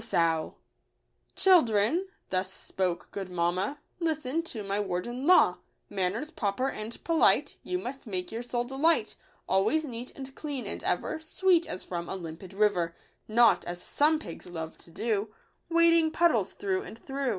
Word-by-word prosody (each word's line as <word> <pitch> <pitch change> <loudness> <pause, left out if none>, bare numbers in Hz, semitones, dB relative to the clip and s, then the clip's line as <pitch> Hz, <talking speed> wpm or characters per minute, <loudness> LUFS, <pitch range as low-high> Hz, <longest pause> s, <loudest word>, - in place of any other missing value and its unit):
89 165 -7 +1 0.4
" - - -44
Children," 320 - +4 0.2
thus 185 0 0
spoke 180 -2 -3
good 195 -2 -5
mamma 180 +9 0
" - - -44
Listen 310 0 -1
to 235 -10 -6
my 200 +1 -1
word 180 -3 -2
and 250 +4 -4
law. 365 - +6 0.3
Manners 205 - -1
proper 255 -4 -1
and 215 +2 -5
polite 330 -1 +3
You 365 - -2
must 270 -7 -6
make 185 -3 -3
your 225 +1 -3
sole 240 0 -2
delight; 270 -1 +1 0.3
Always 215 +12 +2
neat 245 -2 -6
and 265 -1 -8
clean, 285 -3 -5
and - - -4
ever 315 - -1
Sweet 345 +2 +2
as 185 - -5
from 170 -1 -4
a - - -3
limpid 175 +1 -8
river; 180 -5 +2 0.3
Not 235 +2 +5
as 175 0 -5
some 300 - +2
pigs 170 - -9
love 160 -2 -6
to - - -16
do, 210 +3 -1 0.4
Wading 335 -1 +5
puddles 340 +2 +2
through 385 -2 -1
and 310 - -9
through." 270 +2 -3
230 Hz, 165 wpm, -29 LUFS, 185-310 Hz, 0.4 s, law